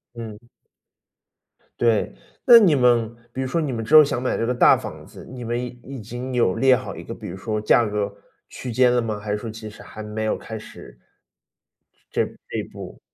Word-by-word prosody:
嗯。 115 0 -9 1.3
对。 115 -3 +2 0.4
那 235 - +12
你 185 -10 +5
们 120 -3 +3 0.2
比 130 - -4
如 130 - -2
说 165 +5 0
你 145 -4 -2
们 115 -2 -3
之 155 - -4
后 155 - +11
想 125 -3 -2
买 130 - -1
这 115 - -1
个 125 - 0
大 120 - +6
房 - - -8
子， - - -13
你 125 -1 -8
们 120 +1 -2
已 125 - -3 0.2
已 135 -3 -8
经 120 +4 -6
有 115 -7 +2
列 130 -1 +5
好 130 - -6
一 - - -8
个 115 - -7
比 110 -3 -9
如 90 +2 -7
说 110 +1 -3
价 115 +2 +4
格 105 -1 -2 0.4
区 125 - -7
间 125 +1 +4
了 120 - +2
吗？ 110 -2 -3
还 105 0 -5
是 105 - 0
说 115 +1 -6
其 110 0 -8
实 105 - -13
还 110 - -10
没 105 +1 -4
有 110 - 0
开 110 - -7
始 - - -12 1.1
这 - - +1 0.2
这 - - -3
一 - - -2
步？ - - -10
115 Hz, 240 characters per minute, -23 LUFS, 110-125 Hz, 1.3 s, 那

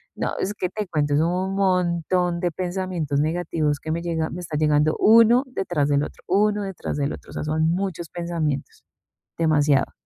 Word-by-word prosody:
No, - - -3
es 200 - -1
que 185 - -2
te 210 +1 -4
cuento, 150 -4 0
son 160 +3 +2 0.2
un - - -3
montón 180 -2 +1
de 175 -1 0
pensamientos 175 -4 -2
negativos 155 -2 -1
que 155 - -5
me 170 - -2
llega 165 -2 -2
me 180 - -6
está 155 -3 -4
llegando 150 0 +2
uno 230 +3 +6
detrás 175 - -1
del 145 0 +2
otro, - - -8
uno 205 +2 +2
detrás 190 -6 -5
del 140 0 -1
otro, - - -11
o - - -11
sea, - - -4
son 155 +1 +1
muchos 175 -2 -2
pensamientos, 165 -5 -3 0.5
demasiado. 150 -4 +2
170 Hz, 185 wpm, -23 LUFS, 150-185 Hz, 0.5 s, uno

